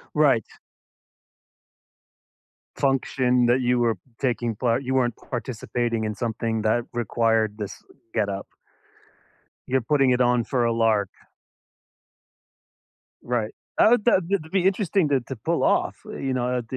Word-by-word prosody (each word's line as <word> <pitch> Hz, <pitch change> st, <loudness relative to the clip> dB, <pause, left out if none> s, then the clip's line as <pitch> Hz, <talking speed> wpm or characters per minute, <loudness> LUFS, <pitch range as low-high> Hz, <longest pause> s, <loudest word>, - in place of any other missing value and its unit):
Right. 140 Hz, -8 st, +4 dB, 2.3 s
Function 130 Hz, -2 st, +2 dB
that 125 Hz, +2 st, +3 dB
you 125 Hz, 0 st, +2 dB
were 115 Hz, -3 st, +2 dB, 0.2 s
taking 120 Hz, -4 st, -1 dB
part, 120 Hz, +2 st, 0 dB
you 130 Hz, 0 st, -2 dB
weren't 120 Hz, -3 st, +2 dB
participating 120 Hz, -2 st, -3 dB
in 105 Hz, -1 st, -3 dB
something 115 Hz, -1 st, -2 dB
that 110 Hz, +2 st, +2 dB
required 115 Hz, -2 st, +1 dB
this 105 Hz, -3 st, -7 dB, 0.3 s
getup. 100 Hz, -3 st, -2 dB, 1.2 s
You're 130 Hz, +1 st, +2 dB
putting 135 Hz, +1 st, +2 dB
it 125 Hz, 0 st, +2 dB
on 120 Hz, -1 st, +3 dB
for 125 Hz, -3 st, 0 dB
a 115 Hz, -, +2 dB
lark. 110 Hz, -4 st, +2 dB, 2.1 s
Right. 120 Hz, -3 st, -2 dB, 0.2 s
That 220 Hz, -, +6 dB
would 240 Hz, -4 st, +3 dB
that'd 185 Hz, -6 st, +1 dB
be 190 Hz, -1 st, +2 dB
interesting 195 Hz, -4 st, +2 dB
to 135 Hz, -2 st, +2 dB
to 125 Hz, +2 st, -7 dB
pull 110 Hz, -, -1 dB
off, -, -, +1 dB
you 135 Hz, -1 st, -4 dB
know? 125 Hz, 0 st, -1 dB
120 Hz, 125 wpm, -24 LUFS, 115-135 Hz, 2.3 s, That